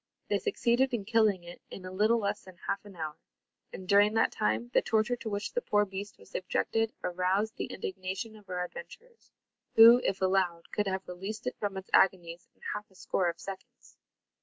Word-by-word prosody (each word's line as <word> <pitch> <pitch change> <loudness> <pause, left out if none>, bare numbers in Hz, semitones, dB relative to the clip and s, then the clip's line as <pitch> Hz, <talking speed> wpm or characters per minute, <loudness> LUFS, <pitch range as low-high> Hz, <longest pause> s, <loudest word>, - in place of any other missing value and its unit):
They - - +2
succeeded 260 - +1
in 205 -4 -5
killing 215 -4 +3
it 175 0 -11
in 185 - -9
a 185 - -6
little 215 +5 +3
less 205 -1 -1
than 185 -2 -14
half 200 - -2
an 200 -2 -12
hour; 155 -2 -5 0.5
and, 185 - -9
during 205 +2 +5
that 225 - +3
time, 110 +3 -1
the - - +5
torture 220 +2 +1
to 225 - -5
which 205 0 -3
the 485 - 0
poor 210 - +2
beast 195 +1 -7
was - - -18
subjected 225 +4 0
aroused 185 +5 0
the - - -2
indignation 190 +4 -5
of 205 -2 -17
our 180 -1 -2
adventurers, 475 - -12 0.5
who, 230 +2 +10
if 195 - 0
allowed, 185 -3 0
could 210 -1 0
have 190 0 -2
released 195 +6 -6
it 250 - -2
from 200 -2 -2
its 190 - -8
agonies 175 -2 +3
in - - -34
half 210 - -6
a 190 - -25
score 185 -1 0
of 170 - -6
seconds. 245 +6 -10
195 Hz, 200 wpm, -30 LUFS, 185-220 Hz, 0.5 s, who